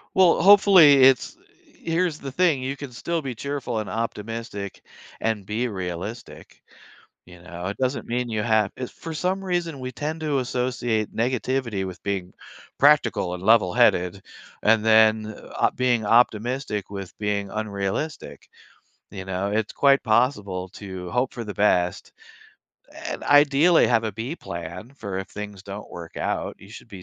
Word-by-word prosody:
Well, 180 -3 +5
hopefully, 185 -8 +7
it's 135 -2 +3 0.4
here's 165 -1 -1
the 135 -1 -7
thing, 160 -4 +2
you 135 +2 -4
can 140 -2 -8
still 165 +7 -3
be 130 -2 -4
cheerful 135 -2 -4
and 105 - -5
optimistic 115 -2 -5 0.4
and 110 -2 -1
be 110 +4 -1
realistic. 95 +2 -7 0.6
You 90 -1 -15
know? 90 0 -8
It 100 - -4
doesn't 130 +1 -1
mean 120 +1 -2
you 110 -2 -2
have 110 -2 +2
eh, 130 - -3
for 165 - -9
some 185 +4 -1
reason, 175 -5 -2
we 130 0 -5
tend 150 +5 -4
to 150 -3 0
associate 125 -3 -2
negativity 120 -3 -1
with 90 -3 -8
being 95 -3 -3 0.5
practical 135 -11 +3
and 90 - -9
levelheaded 95 -3 +3 0.4
and 110 0 +3
then 110 -1 +4 0.2
op - - +1
being 120 -3 +1
optimistic 115 -1 +1
with 100 -2 -8
being 100 -1 -2
unrealistic, 100 - -4 0.6
you 95 -2 -7
know? 95 +1 -2
It's 110 0 -1
quite 140 -1 +4
possible 105 -6 0
to 95 -3 -8
hope 125 +1 0
for 120 - -5
the 105 - -6
best 90 -4 +1 1.0
and - - -5
ideally 145 +4 +5
have 115 -2 +2
a 110 - -2
B 120 - -5
plan 85 +8 -8
for 100 -7 -5
if 95 - -5
things 105 -2 -8
don't 100 +1 -9
work 85 -1 -10
out, - - -2
you - - -14
should - - -12
be 95 -2 -10
115 Hz, 155 wpm, -24 LUFS, 100-135 Hz, 1.0 s, hopefully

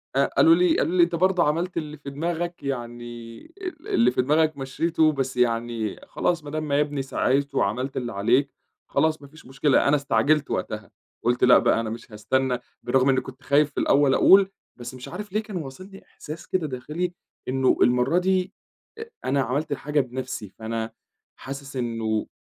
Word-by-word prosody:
آآ، 140 0 +4
قالوا 165 - +7
لي 180 -1 +3
قالوا 180 +3 0
لي 175 - +7
أنت 170 0 0
برضو 185 +1 +2
عملت 170 +4 0
اللي 155 -2 -4
في 140 -1 -8
دماغك 170 +4 -3
يعني 120 -3 -6 0.2
ال 360 -5 -7
اللي 120 +2 +3
في 125 - +1
دماغك 155 +3 +2
مشيته 155 +4 +1
بس 135 -3 -3
يعني 115 -2 0
خلاص 170 -3 -1
ما 145 - -8
دام 155 0 -3
ما 140 -1 +1
يا 150 - +4
بني 145 -2 -4
سَعيت 135 +1 0
وعملت 125 +7 -1
اللي 120 -2 -3
عليك، 120 +8 +2 0.4
خلاص 155 -1 +1
ما 140 - -12
فيش 155 +3 -17
مشكلة 135 +2 +2
أنا 145 - +4
استعجلت 145 +1 +1
وقتها، - - -4 0.3
قُلت 120 +1 +1
لأ 125 0 +8
بقى - - +2
أنا 115 -1 -2
مش 115 +1 -8
هاستنى 125 +4 0 0.2
بالرغم 135 0 +2
إني 130 -1 +3
كنت 130 +2 -12
خايف 145 +1 +3
في - - -4
الأول 140 -1 +4
أقول 195 +7 +6 0.3
بس 120 0 -8
مش 130 -1 -9
عارف 205 +2 -7
ليه 215 +2 -1
كان 215 -2 -9
واصلني 185 +6 -9
إحساس 155 +2 -10
كده 180 -4 -1
داخلي، 150 +7 -4 0.3
إنه 130 0 +2
المرة 125 +7 +3
دي 185 +1 +1 0.7
أنا 135 +1 +2
عملت 135 +5 -1
حاجة 150 +1 -1
بنفسي، 130 -5 -4
فأنا 110 +2 -5 0.5
حاسس 135 +1 -8
إنه 115 -3 -2
140 Hz, 180 wpm, -24 LUFS, 125-160 Hz, 0.7 s, لأ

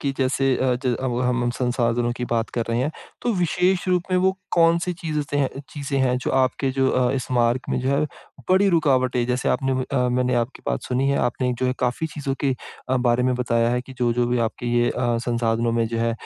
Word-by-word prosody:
कि 140 - 0
जैसे 135 0 +2
आज 130 0 0
अब 125 0 -1
हम 125 -1 +1
उन 120 - +1
संसाधनों 120 -1 0
की 125 - -3
बात 115 -1 -1
कर 115 - 0
रहे 115 - 0
हैं। 145 - 0 0.3
तो 240 - +1
विशेष 180 +1 +1
रूप 180 -1 +2
में 185 - +3
वो 190 +1 +3 0.2
कौन-सी 170 +1 +3
चीज़ 160 -3 -4
स 145 -2 0 0.2
चीज़ें 140 -2 -3
हैं 125 -1 +2
जो - - -3
आपके 130 +1 +1
अ, - - +2
जो 130 -1 +2
इस 130 -2 -3
मार्ग 120 0 +2
में - - 0
जो 130 - -1
है 140 +2 +2 0.5
बड़ी 195 +2 +5
रुकावटें, 130 -7 +2
जैसे 125 +1 0
आपने 135 -2 +1 0.2
अ, 125 -2 +2
मैंने 125 0 +1
आपकी 120 +2 -2
बात 60 -1 -1
सुनी 130 +2 0
है, 140 - +2
आपने 125 +1 0
जो 130 - 0
है 125 - +1
काफ़ी 125 +6 -1
चीज़ों 145 -3 -4
के 135 -2 +1 0.3
अ, 130 - +2
बारे 125 -1 +2
में 130 0 +2
बताया 115 -1 +1
है 125 0 0
कि 130 - -10
जो-जो 120 0 +1
भी 120 0 0
आपके 120 - -9
ये 120 0 +2
अ, 120 -2 0
संसाधनों 115 -1 0
में 115 -1 +1
जो 115 0 -3
है 115 0 +1
125 Hz, 230 wpm, -23 LUFS, 120-140 Hz, 0.5 s, बड़ी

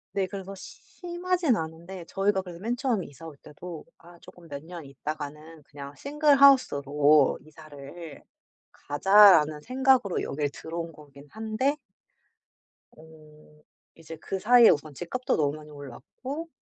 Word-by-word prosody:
네. 195 -1 0
그래서 195 0 -8
심하진 350 - -3
않은데 165 +2 -7
저희가 195 0 0
그래서 175 -2 -10
맨 230 +5 -2
처음 235 -8 -1
이사 145 +3 -13
올 160 -3 -10
때도 160 +3 -10
'아 170 0 -17
쪼끔 170 -1 -16
몇 140 -1 -8
년 170 -2 -10
있다가는 150 +3 -8
그냥 140 -1 -10
single 295 0 +2
house로 150 - +4
이사를 155 +1 -12 0.5
가자.'라는 155 -1 +5
생각으로 255 - +1
여길 145 0 -2
들어온 165 +2 -7
거긴 145 -2 -16
한데 220 +6 -2 1.1
어 155 -1 -19 0.3
이제 165 0 -11
그 190 +4 -5
사이에 240 +3 +6
우선 145 0 0
집값도 215 - -3
너무 145 -1 0
많이 150 0 -13
올랐고 155 - -8
165 Hz, 310 characters per minute, -26 LUFS, 150-215 Hz, 1.1 s, 사이에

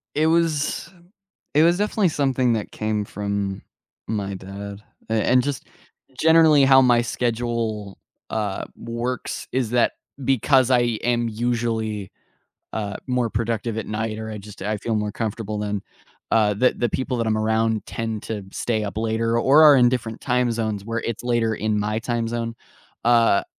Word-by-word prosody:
It 155 +1 +3
was 165 0 +1 0.6
it 150 - +5
was 170 +1 +4
definitely 205 -1 +1
something 130 -5 +1
that 110 -2 -3
came 110 -1 -2
from 100 -1 -3 0.5
my 100 -3 -2
dad, 100 +2 -8 0.3
and 110 -1 +1
and 125 0 +4
just 140 0 -4 0.5
generally 160 -3 +6
how 135 0 +7
my 120 -2 +4
schedule, 115 -3 -2 0.3
uh, 105 -3 -2
works 120 +2 -4
is 125 -3 -1
that 120 -1 +3 0.3
because 130 0 +3
I 125 -1 +5 0.2
am 120 -1 +1
usually, 110 -3 -2 0.6
uh, 105 -2 -3
more 125 -2 0
productive 115 0 -2
at 110 - -3
night 110 0 -3
or 110 0 -5
I 105 - -6
just, 105 0 -12
I 105 +1 -1
feel 110 +2 -2
more 105 -1 -1
comfortable 110 -1 -3
than, 105 -1 -3 0.5
uh, 105 -2 +3
the 125 +5 +3
the 120 - -1
people 130 +2 -2
that 115 -1 -1
I'm 110 - +1
around 110 0 +1
tend 115 -2 -4
to 105 -3 -4
stay 110 -1 -1
up 105 +1 -5
later 115 +1 0
or 140 +6 +6
are 150 -2 +9
in 125 -2 +5
different 115 -3 -3
time 125 -1 +1
zones 110 -3 -2
where 115 0 -2
it's 115 0 -4
later 120 -2 +1
in 105 -1 0
my 105 +1 -1
time 120 -1 -2
zone, 115 0 -3 0.5
uh, 115 -4 +4
115 Hz, 165 wpm, -23 LUFS, 105-125 Hz, 0.6 s, are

